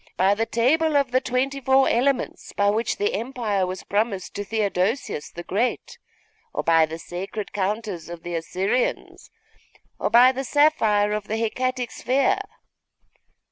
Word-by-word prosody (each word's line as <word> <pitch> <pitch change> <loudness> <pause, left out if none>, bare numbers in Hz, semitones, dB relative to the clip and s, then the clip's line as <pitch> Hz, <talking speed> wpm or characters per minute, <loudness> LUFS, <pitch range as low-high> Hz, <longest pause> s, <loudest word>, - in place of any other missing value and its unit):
By 190 +2 +4
the 225 +2 -1
table 300 +6 +2
of 275 -3 +1
the 255 +1 +2
twenty 265 +2 -1
four 265 +1 +4
elements, 255 +2 0
by 200 0 +2
which 225 +3 -1
the 205 - 0
Empire 215 -4 -1
was 185 +1 -6
promised 200 -2 -1
to 205 - -4
Theodosius 205 - -1
the 175 - -8
Great, 220 +8 -2 0.6
or - - -1
by 165 -1 +4
the 160 +1 -6
sacred 190 +5 -6
counters 200 -3 -3
of 170 -1 -8
the 175 - -5
Assyrians, 190 +8 -2 0.7
or - - 0
by 240 +3 +7
the 265 +1 -4
sapphire 225 -9 +3
of 210 -1 -3
the 220 - -2
Hecatic 250 +2 -2
sphere? 275 +10 +1
220 Hz, 150 wpm, -24 LUFS, 195-255 Hz, 0.7 s, by